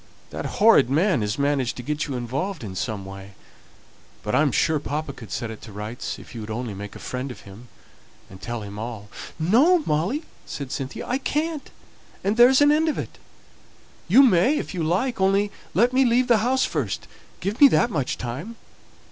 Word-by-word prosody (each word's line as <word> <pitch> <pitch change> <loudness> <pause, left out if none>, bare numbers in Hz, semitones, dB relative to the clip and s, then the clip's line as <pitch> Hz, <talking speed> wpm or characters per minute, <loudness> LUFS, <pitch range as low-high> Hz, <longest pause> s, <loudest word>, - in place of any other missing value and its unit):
That - - -4
horrid 205 - +6
man 160 - +2
has 105 +2 -2
managed 140 -4 0
to 125 - -6
get 150 +3 -2
you 140 - -4
involved 135 - -3
in 95 -3 -7
some 105 -1 -3
way; 95 0 -10 0.9
but 105 - -3
I - - +4
am 150 -3 +2
sure 155 +5 +2
papa 145 0 -4
could 115 -5 -12
set 115 -1 -3
it 110 - -10
to 110 - -11
rights, 105 +4 -5
if - - -13
you 115 - -6
would 105 - -8
only 115 0 -4
make 100 +1 -8
a - - -7
friend 130 +2 -5
of 125 - -9
him, 100 +5 -13 0.6
and 95 0 -14
tell 120 -2 -5
him 100 0 -8
all 110 -2 -6 0.2
" - - -15
"No, 275 - +4
Molly," 180 - 0 0.2
said 140 -3 -6
Cynthia, 135 0 -5
"I 250 +2 0
can't, 300 +2 -2 0.5
and 200 +2 +1
there's 250 +4 +6
an 290 0 +6
end 315 +2 +3
of 300 - -2
it. - - -6 0.9
You 245 +10 +7
may 235 - +4
if - - -4
you 180 - -3
like, 190 +8 0
only 200 +2 +2 0.2
let 240 +6 +3
me 265 +1 +4
leave 245 0 +3
the 235 -3 +5
house 255 +4 +2
first; 135 - -3 0.3
give 200 +8 -4
me 285 - +11
that 240 -3 +2
much 140 -8 -1
time." 135 - -6
150 Hz, 205 wpm, -24 LUFS, -, 0.9 s, me